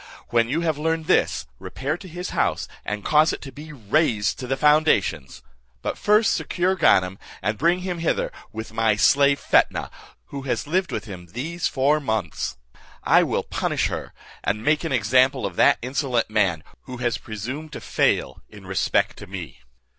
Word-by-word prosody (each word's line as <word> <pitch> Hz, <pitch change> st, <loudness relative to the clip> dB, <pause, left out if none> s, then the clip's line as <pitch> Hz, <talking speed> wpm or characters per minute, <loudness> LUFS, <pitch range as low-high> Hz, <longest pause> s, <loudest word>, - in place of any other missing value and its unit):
When 115 Hz, -1 st, +2 dB
you 155 Hz, +6 st, 0 dB
have 160 Hz, -3 st, -1 dB
learnt 160 Hz, +1 st, -1 dB
this, -, -, +2 dB
repair 140 Hz, +4 st, -3 dB
to 185 Hz, +2 st, -11 dB
his 180 Hz, +1 st, -6 dB
house, -, -, 0 dB, 0.2 s
and 105 Hz, -1 st, -4 dB
cause 155 Hz, +1 st, +4 dB
it -, -, -6 dB
to 135 Hz, -, -8 dB
be 150 Hz, +2 st, -10 dB
razed 115 Hz, -4 st, 0 dB
to 125 Hz, -, -5 dB
the 135 Hz, +1 st, -1 dB
foundations; 150 Hz, -, +2 dB, 0.4 s
but -, -, -2 dB
first 215 Hz, +2 st, +3 dB
secure 185 Hz, +1 st, 0 dB
Ganem, 95 Hz, -, +3 dB, 0.2 s
and 105 Hz, +3 st, 0 dB
bring 170 Hz, +8 st, +2 dB
him 180 Hz, -2 st, -3 dB
hither, 165 Hz, -, 0 dB, 0.2 s
with 110 Hz, 0 st, -7 dB
my 110 Hz, -1 st, +2 dB
slave 140 Hz, +5 st, +4 dB
Fetnah, -, -, +2 dB, 0.4 s
who 140 Hz, -, -6 dB
has 125 Hz, -4 st, -2 dB
lived 180 Hz, +5 st, 0 dB
with -, -, -4 dB
him 90 Hz, -4 st, -9 dB
these 160 Hz, +8 st, -2 dB
four 145 Hz, +3 st, +2 dB
months. 110 Hz, -, -3 dB, 0.5 s
I -, -, +5 dB
will -, -, 0 dB
punish -, -, -1 dB
her, -, -, -5 dB, 0.3 s
and 105 Hz, +1 st, -1 dB
make 155 Hz, +2 st, +2 dB
an 165 Hz, -, -3 dB
example 130 Hz, +2 st, +3 dB
of -, -, -4 dB
that -, -, +5 dB
insolent 125 Hz, -3 st, -1 dB
man, 95 Hz, -8 st, +1 dB, 0.2 s
who 125 Hz, -, -7 dB
has 120 Hz, -1 st, -1 dB
presumed 130 Hz, +9 st, -6 dB
to -, -, -5 dB
fail 65 Hz, -, 0 dB
in 105 Hz, -2 st, -13 dB
respell 95 Hz, -2 st, 0 dB
to -, -, -11 dB
me." 90 Hz, -6 st, -8 dB
130 Hz, 175 wpm, -23 LUFS, 105-155 Hz, 0.5 s, I